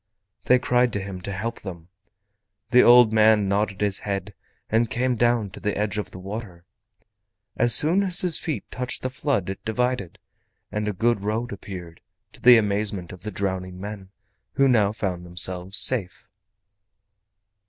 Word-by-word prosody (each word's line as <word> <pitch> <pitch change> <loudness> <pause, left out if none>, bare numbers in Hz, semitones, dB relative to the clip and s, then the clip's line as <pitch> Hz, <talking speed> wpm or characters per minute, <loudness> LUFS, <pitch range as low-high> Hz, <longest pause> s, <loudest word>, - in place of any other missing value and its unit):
They 125 - +5
cried 125 -1 +1
to 100 - -1
him 95 -1 -7
to 100 - -6
help 110 +4 -5
them. 85 -3 -9 0.8
The 125 0 +7
old 120 -2 +6
man 110 -2 +4
nodded 100 0 -1
his 100 -2 0
head 100 0 -4 0.3
and 115 +1 +1
came 125 +2 0
down 120 -3 +1
to - - -11
the 105 - -2
edge 105 0 -1
of 105 - -5
the - - -11
water. 95 -2 -8 0.9
As 120 -1 +5
soon 170 +6 +5
as 185 -2 +3
his 175 -3 +2
feet 145 - -4
touched 125 0 -4
the 130 - -2
flood 130 - -1
it 95 0 -6
divided, 110 -4 -2 0.5
and 105 0 -3
a - - 0
good 115 +1 0
road 110 +4 -3
appeared, 90 -4 -9 0.3
to - - -17
the 125 -1 +8
amazement 100 -4 -1
of 90 - -13
the 105 - -5
drowning 95 -2 -4
men, 100 -1 -8 0.4
who 135 - +3
now 110 -6 +3
found 95 -5 -4
themselves 90 +2 -1
safe. 105 -8 -1
105 Hz, 165 wpm, -24 LUFS, 95-120 Hz, 0.9 s, the